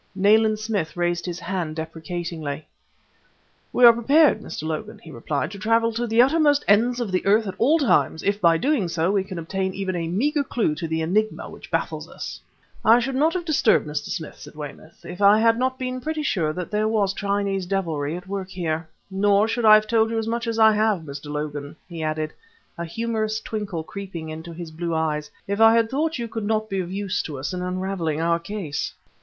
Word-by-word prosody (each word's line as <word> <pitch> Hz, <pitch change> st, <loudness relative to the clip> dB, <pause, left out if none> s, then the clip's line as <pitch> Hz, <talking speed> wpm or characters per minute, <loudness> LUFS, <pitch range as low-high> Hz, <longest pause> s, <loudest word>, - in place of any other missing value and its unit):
Nayland 215 Hz, +2 st, +4 dB
Smith 210 Hz, -7 st, -3 dB
raised 175 Hz, 0 st, 0 dB
his 175 Hz, 0 st, -4 dB
hand 170 Hz, -3 st, -3 dB
deprecatingly. 160 Hz, -2 st, -5 dB, 1.1 s
"We 245 Hz, -, +5 dB
are 235 Hz, -, +10 dB
prepared, 280 Hz, +7 st, +4 dB
Mr. -, -, -7 dB
Logan," 155 Hz, -1 st, -4 dB
he 160 Hz, -, -13 dB
replied, 140 Hz, +6 st, -3 dB
"to 200 Hz, -, -8 dB
travel 230 Hz, +2 st, +2 dB
to 240 Hz, +2 st, -2 dB
the 230 Hz, +2 st, +5 dB
uttermost 290 Hz, +1 st, +3 dB
ends 235 Hz, +5 st, +4 dB
of 230 Hz, -5 st, -2 dB
the 185 Hz, -, 0 dB
earth 215 Hz, +3 st, +3 dB
at 190 Hz, -, -4 dB
all 285 Hz, +8 st, +4 dB
times, 260 Hz, -, +2 dB
if 200 Hz, +1 st, 0 dB
by 165 Hz, -2 st, +5 dB
doing 265 Hz, -, +1 dB
so 165 Hz, +2 st, 0 dB
we 200 Hz, -2 st, +1 dB
can 190 Hz, -2 st, -8 dB
obtain 190 Hz, +3 st, -3 dB
even 190 Hz, -1 st, -2 dB
a 165 Hz, -1 st, -2 dB
meager 285 Hz, -, +1 dB
clue 230 Hz, -, 0 dB
to 165 Hz, +2 st, -4 dB
the 160 Hz, 0 st, -1 dB
enigma 215 Hz, +6 st, 0 dB
which -, -, -12 dB
baffles -, -, -2 dB
us." -, -, -7 dB, 0.4 s
"I 225 Hz, +2 st, +7 dB
should 255 Hz, +3 st, -1 dB
not 310 Hz, +6 st, +2 dB
have 350 Hz, -2 st, -2 dB
disturbed 290 Hz, -, +3 dB
Mr. 150 Hz, 0 st, -3 dB
Smith," 160 Hz, -6 st, -6 dB
said -, -, -12 dB
Weymouth, 150 Hz, +2 st, -10 dB
"if 180 Hz, +3 st, -8 dB
I 200 Hz, +1 st, +7 dB
had 230 Hz, +1 st, +3 dB
not 260 Hz, +1 st, 0 dB
been 255 Hz, 0 st, -4 dB
pretty 310 Hz, +3 st, -3 dB
sure 165 Hz, -, 0 dB
that 180 Hz, +3 st, -6 dB
there 215 Hz, +1 st, +1 dB
was 205 Hz, -3 st, +1 dB
Chinese 200 Hz, -2 st, -1 dB
devilry 165 Hz, -5 st, -1 dB
at 180 Hz, +2 st, -11 dB
work 195 Hz, -1 st, -4 dB
here: 165 Hz, -3 st, -3 dB, 0.2 s
nor 200 Hz, +2 st, +3 dB
should 230 Hz, +1 st, -1 dB
I 215 Hz, 0 st, +10 dB
have 215 Hz, 0 st, +3 dB
told 225 Hz, 0 st, +2 dB
you 225 Hz, -, -2 dB
as 225 Hz, 0 st, -2 dB
much 235 Hz, +1 st, -2 dB
as 230 Hz, -1 st, -1 dB
I 220 Hz, -1 st, +7 dB
have, 215 Hz, -3 st, +1 dB
Mr. 145 Hz, -1 st, -8 dB
Logan," 150 Hz, 0 st, -4 dB
he 170 Hz, -3 st, -7 dB
added, 155 Hz, 0 st, -2 dB, 0.4 s
a 170 Hz, -, -4 dB
humorous 220 Hz, +3 st, -2 dB
twinkle 205 Hz, -7 st, -4 dB
creeping 180 Hz, -3 st, -7 dB
into 160 Hz, +2 st, -7 dB
his 165 Hz, -1 st, -8 dB
blue 165 Hz, +1 st, -3 dB
eyes, 150 Hz, -1 st, -1 dB, 0.2 s
"if 200 Hz, +2 st, -1 dB
I 225 Hz, 0 st, +7 dB
had 230 Hz, -1 st, +2 dB
thought 315 Hz, +4 st, 0 dB
you 235 Hz, -1 st, -3 dB
could 225 Hz, -2 st, -4 dB
not 215 Hz, -1 st, -1 dB
be 195 Hz, -, 0 dB
of 180 Hz, -1 st, -4 dB
use 195 Hz, 0 st, -1 dB
to 150 Hz, -3 st, -6 dB
us 140 Hz, +7 st, -4 dB
in 180 Hz, -, -3 dB
unraveling 180 Hz, -4 st, -2 dB
our 170 Hz, +1 st, +1 dB
case!" 170 Hz, -4 st, -4 dB
195 Hz, 215 wpm, -23 LUFS, 165-225 Hz, 1.1 s, are